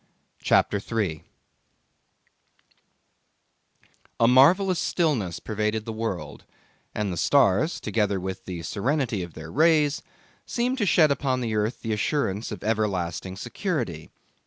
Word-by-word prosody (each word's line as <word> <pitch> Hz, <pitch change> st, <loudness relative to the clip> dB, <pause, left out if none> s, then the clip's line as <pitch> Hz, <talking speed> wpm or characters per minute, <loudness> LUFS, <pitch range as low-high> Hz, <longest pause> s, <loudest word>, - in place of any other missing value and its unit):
CHAPTER 100 Hz, -, +2 dB
3 100 Hz, -7 st, -2 dB, 3.0 s
A 115 Hz, -, +5 dB
marvellous 175 Hz, +9 st, +5 dB
stillness 125 Hz, -, 0 dB
pervaded 110 Hz, 0 st, -2 dB
the 115 Hz, -, -5 dB
world, 110 Hz, -5 st, -5 dB, 0.5 s
and 105 Hz, -3 st, -1 dB
the -, -, -5 dB
stars, 140 Hz, -, +3 dB
together 105 Hz, -2 st, 0 dB
with 95 Hz, +1 st, -6 dB
the 85 Hz, -3 st, -6 dB
serenity 120 Hz, -, -1 dB
of 85 Hz, -2 st, -7 dB
their 80 Hz, 0 st, -9 dB
rays, 155 Hz, -2 st, +3 dB, 0.4 s
seemed 250 Hz, +2 st, -1 dB
to 205 Hz, -, +1 dB
shed 155 Hz, -4 st, +5 dB
upon 130 Hz, -2 st, 0 dB
the 115 Hz, -2 st, -2 dB
earth 105 Hz, +3 st, -1 dB
the 110 Hz, -2 st, -1 dB
assurance 105 Hz, -2 st, -1 dB
of 105 Hz, -, -7 dB
everlasting 95 Hz, -5 st, -1 dB
security. 120 Hz, -, -4 dB
110 Hz, 120 wpm, -25 LUFS, 95-145 Hz, 3.0 s, A